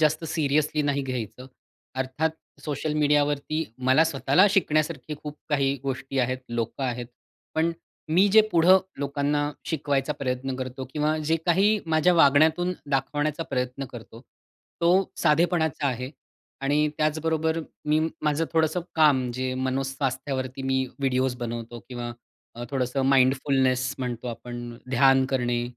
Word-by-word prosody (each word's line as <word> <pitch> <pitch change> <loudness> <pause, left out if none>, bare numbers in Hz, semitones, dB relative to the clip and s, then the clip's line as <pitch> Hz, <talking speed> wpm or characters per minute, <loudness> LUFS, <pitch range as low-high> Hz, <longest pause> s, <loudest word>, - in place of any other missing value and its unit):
जास्त 155 +1 +2
सीरियसली 155 -1 +1
नाही 140 -1 0
घ्यायचं. 125 -1 -5 0.5
अर्थात 130 +5 -1 0.3
सोशल 150 +1 -3
मीडियावरती 150 +1 +1 0.2
मला 145 +5 +6
स्वतःला 145 - +3
शिकण्यासारखी 155 -5 0
खूप 150 0 -7
काही 140 -2 +1
गोष्टी 135 0 -3
आहेत, 130 0 +1
लोकं 120 +2 -3
आहेत. 120 -1 -3 0.5
पण 160 +1 +1 0.4
मी 185 +4 +5
जे 220 +3 +7
पुढं 175 +3 +6 0.2
लोकांना 145 +1 0 0.2
शिकवायचा 145 -2 -1
प्रयत्न 130 -1 -3
करतो 130 0 -5
किंवा 155 +1 +1
जे 155 +1 +1
काही 200 +5 +4
माझ्या 160 +2 +3
वागण्यातून 160 +3 +4 0.2
दाखवण्याचा 145 +3 0
प्रयत्न 125 +1 -2
करतो 115 -1 -11 0.6
तो 170 - +3 0.3
साधेपणाचा 160 -2 +2
आहे 130 0 -3 0.5
आणि 145 +2 +2
त्याचबरोबर 160 +1 0 0.3
मी 155 +1 +3 0.2
माझं 150 +2 +1
थोडंसं 160 +2 +2
काम 140 -6 +4
जे 130 0 -2
मनोस्वास्थ्यावरती 130 0 -2
मी 130 0 +1
व्हिडिओज 130 -2 0
बनवतो 120 -1 -6
किंवा 120 -1 -5 0.4
अ, 120 - -5
थोडंसं 130 0 -1
माइंडफुलनेस 130 -1 +2
म्हणतो 125 -2 -4
आपण 120 0 -7
ध्यान 135 +1 +5
करणे, 120 -2 0
140 Hz, 125 wpm, -25 LUFS, 130-155 Hz, 0.6 s, जे